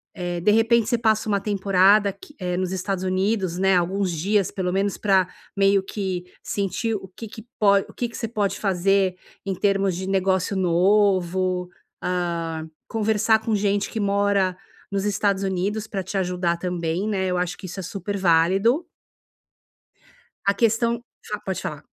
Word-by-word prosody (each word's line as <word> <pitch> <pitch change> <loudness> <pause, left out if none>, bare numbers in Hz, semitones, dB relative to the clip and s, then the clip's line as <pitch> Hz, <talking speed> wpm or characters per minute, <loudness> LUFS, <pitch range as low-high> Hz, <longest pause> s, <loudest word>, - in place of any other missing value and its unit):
eh, 175 -1 -3
de 210 - +4
repente, 225 +1 +3
você 240 - +2
passa 220 -1 +1
uma 200 -2 +1
temporada 200 0 +3
aqui 300 - -11
eh, 180 -2 -2
nos 185 0 -1
Estados 190 0 -2
Unidos, 185 -1 0
né. 190 0 +3
Alguns 185 +1 0
dias, 195 +4 +1
pelo 180 -2 -2
menos 195 +1 0
pra 190 -3 +3 0.3
meio 195 0 +4
que 190 -3 -4 0.2
sentir 205 +3 -2
o 190 -2 -6
que 225 - -7
que 220 +2 -11
pode 200 -2 +4
o - - -13
que 245 - -1
que 230 - -12
você 225 - -3
pode 205 -3 -1
fazer, 195 -1 +2 0.3
em 195 -1 -2
termos 195 -1 +1
de 190 +2 -4
negócio 190 0 +1
novo. 185 0 +2 0.4
Hã, 170 -3 -2 0.2
conversar 220 0 +2
com 220 0 -1
gente 200 0 0
que 220 - -4
mora 200 -2 +1 0.4
nos 195 0 -1
Estados 200 -1 +1
Unidos 200 +3 -1
para 195 -3 -3
te 190 - -7
ajudar 180 -2 0
também, 175 +1 -2
né. 190 -2 0
Eu 180 -1 0
acho 180 +1 -2
que - - -10
isso 185 +2 -7
é - - -4
super 200 +2 -4
válido. 190 - +3 1.6
A 200 - +4
questão 230 +1 +1 0.2
fa 210 - -4
pode 190 -1 -4
falar. 150 - -5
195 Hz, 170 wpm, -23 LUFS, 180-205 Hz, 1.6 s, de